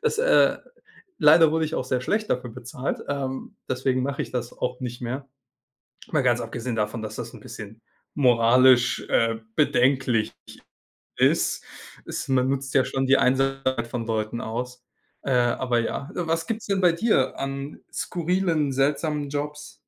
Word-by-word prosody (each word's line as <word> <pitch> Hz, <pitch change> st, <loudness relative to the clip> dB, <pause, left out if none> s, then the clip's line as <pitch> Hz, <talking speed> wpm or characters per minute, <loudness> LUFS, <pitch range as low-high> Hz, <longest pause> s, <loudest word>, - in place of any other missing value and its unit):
Das, 460 Hz, -1 st, 0 dB
äh -, -, +4 dB, 0.6 s
leider 160 Hz, +1 st, +7 dB
wurde 160 Hz, 0 st, +1 dB
ich 155 Hz, -, -5 dB
auch -, -, -1 dB
sehr 130 Hz, -1 st, -1 dB
schlecht 215 Hz, -, -1 dB
dafür 125 Hz, -1 st, -1 dB
bezahlt, 125 Hz, +3 st, -5 dB
ähm, 135 Hz, -2 st, -4 dB
deswegen 130 Hz, 0 st, 0 dB
mache 140 Hz, +1 st, -2 dB
ich -, -, -8 dB
das 125 Hz, -1 st, -3 dB
auch 125 Hz, 0 st, -3 dB
nicht 120 Hz, 0 st, -5 dB
mehr. 130 Hz, +3 st, -4 dB, 0.9 s
Mal 150 Hz, -4 st, +2 dB
ganz 120 Hz, -2 st, +2 dB
abgesehen 120 Hz, +1 st, -4 dB
davon, 105 Hz, +1 st, -2 dB
dass 110 Hz, 0 st, -6 dB
das 120 Hz, 0 st, -6 dB
'n 120 Hz, -, -11 dB
bisschen 110 Hz, +1 st, -10 dB, 0.3 s
moralisch, 125 Hz, -1 st, +5 dB
äh, 115 Hz, 0 st, +2 dB, 0.2 s
bedenklich 125 Hz, -3 st, +2 dB, 0.9 s
ist, -, -, +2 dB, 0.4 s
ist -, -, -5 dB
man 130 Hz, -1 st, +2 dB
nutzt 135 Hz, 0 st, -3 dB
ja 130 Hz, -2 st, +5 dB
schon 135 Hz, +1 st, -1 dB
die 135 Hz, +1 st, +5 dB
Einsamkeit 130 Hz, -2 st, +1 dB
von 115 Hz, -2 st, -4 dB
Leuten 110 Hz, +1 st, -2 dB
aus, 125 Hz, +2 st, -5 dB, 0.4 s
äh, 135 Hz, -, -3 dB
aber 120 Hz, 0 st, +2 dB
ja. 140 Hz, +6 st, -4 dB
Äh, 175 Hz, -, -2 dB
was 165 Hz, 0 st, -1 dB
gibt's 225 Hz, -1 st, -4 dB
denn 195 Hz, -1 st, 0 dB
bei 175 Hz, -, +6 dB
dir 170 Hz, -, +1 dB
an 135 Hz, +1 st, -5 dB
skurrilen, 170 Hz, -4 st, 0 dB
seltsamen 145 Hz, +1 st, 0 dB
Jobs? 150 Hz, +1 st, -5 dB
130 Hz, 160 wpm, -25 LUFS, 120-145 Hz, 0.9 s, leider